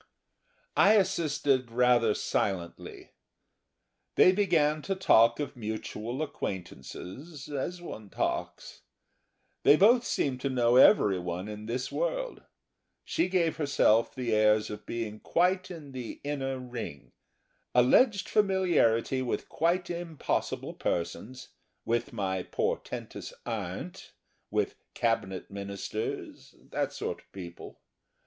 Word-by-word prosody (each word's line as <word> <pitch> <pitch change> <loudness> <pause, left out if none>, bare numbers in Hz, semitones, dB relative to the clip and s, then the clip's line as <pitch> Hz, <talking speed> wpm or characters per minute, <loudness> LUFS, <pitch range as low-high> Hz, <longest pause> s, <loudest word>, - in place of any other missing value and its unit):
I 205 - +6
assisted 150 - +1
rather 120 -2 +3
silently. 90 -4 -3 1.0
They 185 - +7
began 165 -6 +2
to 195 +5 -2
talk 115 -11 +5
of 145 -1 -4
mutual 110 +3 -4
acquaintances 95 - -7
as 160 +5 -4
one 110 - -8
talks. - - -3 0.8
They 145 - +7
both 230 +8 +5
seemed 130 - -1
to 140 - 0
know 120 -2 +3
everyone 95 - +4
in 105 0 -7
this 125 +3 -3
world. - - -2 0.6
She 330 - 0
gave 175 -3 +1
herself 140 -7 +3
the 125 -3 -1
airs 105 0 +3
of 105 0 -8
being 110 -2 -4
quite 185 +2 +1
in 160 -6 -9
the 125 -3 -7
inner 135 -2 -2
ring; 115 - -7 0.6
alleged 195 - +4
familiarity 175 - +2
with 125 - -3
quite 175 +2 0
impossible 170 -3 -3
persons, 110 +9 -3 0.4
with 120 0 0
my 95 -4 -2
portentous - - -4
aunt, - - -5 0.4
with - - -1 0.2
Cabinet 95 -6 -1
Ministers 100 +2 -5
that - - -3
sort - - -4
of - - -25
people. 85 -3 -9
125 Hz, 110 wpm, -29 LUFS, 110-170 Hz, 1.0 s, They